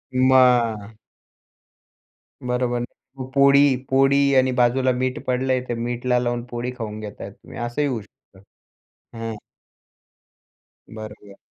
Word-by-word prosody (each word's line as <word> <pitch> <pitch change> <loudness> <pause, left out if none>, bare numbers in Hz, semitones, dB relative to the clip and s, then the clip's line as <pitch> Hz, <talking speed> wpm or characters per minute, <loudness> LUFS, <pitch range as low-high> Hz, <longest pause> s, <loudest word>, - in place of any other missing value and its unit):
मग 120 -5 +3 1.5
बरोबर 125 0 -1
ना, 120 - -3 0.4
मग 130 - -6
पोळी 140 0 +5
पोळी 140 +1 +3
आणि 130 0 +4
बाजूला 130 +2 +3
मीठ 130 +1 -2
पडलंय 130 0 0
ते - - 0
मीठला 120 +1 -1
लावून 120 -1 -2
पोळी 120 +1 -3
खाऊन 110 -2 -6
घेताय 105 -2 -8
तुम्ही 105 - -13
असंही 120 +5 -1
होऊ 120 -5 -3
शकतं. 95 -1 -22 0.8
हं. 115 -1 -5 1.5
बरोबर. 105 -2 -11
125 Hz, 115 wpm, -22 LUFS, 115-130 Hz, 1.5 s, पोळी